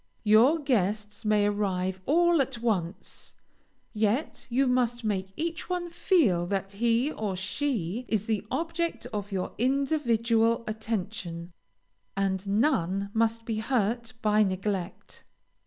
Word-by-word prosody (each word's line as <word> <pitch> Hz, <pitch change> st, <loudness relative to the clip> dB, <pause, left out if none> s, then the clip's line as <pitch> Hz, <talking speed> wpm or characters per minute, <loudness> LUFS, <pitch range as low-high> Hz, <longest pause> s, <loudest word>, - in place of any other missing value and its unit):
Your 225 Hz, +9 st, +6 dB
guests 210 Hz, -, -1 dB
may 210 Hz, -1 st, +3 dB
arrive 190 Hz, -3 st, -1 dB
all 345 Hz, +1 st, +4 dB
at 260 Hz, -2 st, -2 dB
once, 205 Hz, -6 st, -3 dB, 0.6 s
yet 220 Hz, +6 st, -1 dB
you 260 Hz, +3 st, +2 dB
must 245 Hz, -1 st, +1 dB
make 190 Hz, -3 st, -2 dB
each 330 Hz, +2 st, -3 dB
one 355 Hz, -1 st, -2 dB
feel 240 Hz, -, +2 dB
that 195 Hz, 0 st, -2 dB
he 235 Hz, +6 st, +1 dB
or 210 Hz, -7 st, -3 dB
she 205 Hz, -, -2 dB
is 215 Hz, -2 st, 0 dB
the 215 Hz, -3 st, -1 dB
object 335 Hz, -4 st, -2 dB
of 205 Hz, -1 st, -4 dB
your 185 Hz, -2 st, -3 dB
individual 235 Hz, -4 st, +2 dB
attention, 195 Hz, -6 st, -4 dB, 0.6 s
and 195 Hz, 0 st, -1 dB
none 200 Hz, -, +1 dB
must 225 Hz, 0 st, +1 dB
be 225 Hz, -2 st, -2 dB
hurt 235 Hz, 0 st, -1 dB
by 210 Hz, 0 st, +4 dB
neglect. 190 Hz, -2 st, -2 dB
220 Hz, 125 wpm, -28 LUFS, 195-250 Hz, 0.6 s, Your